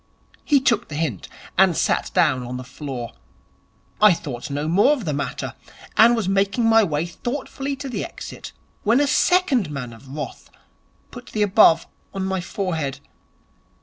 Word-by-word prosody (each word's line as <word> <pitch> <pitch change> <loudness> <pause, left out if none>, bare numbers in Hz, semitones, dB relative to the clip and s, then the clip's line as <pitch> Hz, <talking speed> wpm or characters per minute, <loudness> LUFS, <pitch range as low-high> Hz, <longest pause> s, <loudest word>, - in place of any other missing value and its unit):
He 290 -3 +4
took 235 -3 +1
the 150 - -7
hint, 145 - -3 0.3
and - - +5
sat - - +1
down 130 - +3
on 125 +1 -5
the 130 - -6
floor. 130 -2 -6 0.9
I 210 -3 +8
thought 140 -3 -6
no 145 +2 -2
more 200 - +4
of 255 -9 -4
the 150 - -1
matter, 140 -2 -4 0.4
and 230 +3 +6
was 225 -5 -2
making 195 +4 +1
my 225 0 +6
way 155 -3 -1
thoughtfully 270 +8 -4
to 275 +1 -7
the 250 - -3
exit, - - -8 0.3
when 230 +4 +3
a 290 - +3
second 295 - +2
man 130 -5 -6
of 115 +4 -15
wrath 150 +2 -7 0.6
put 245 0 -11
the 215 - 0
above 195 -5 +5 0.3
on 190 -1 -2
my 190 -1 -1
forehead. 160 -7 -3
190 Hz, 165 wpm, -22 LUFS, 145-235 Hz, 0.9 s, I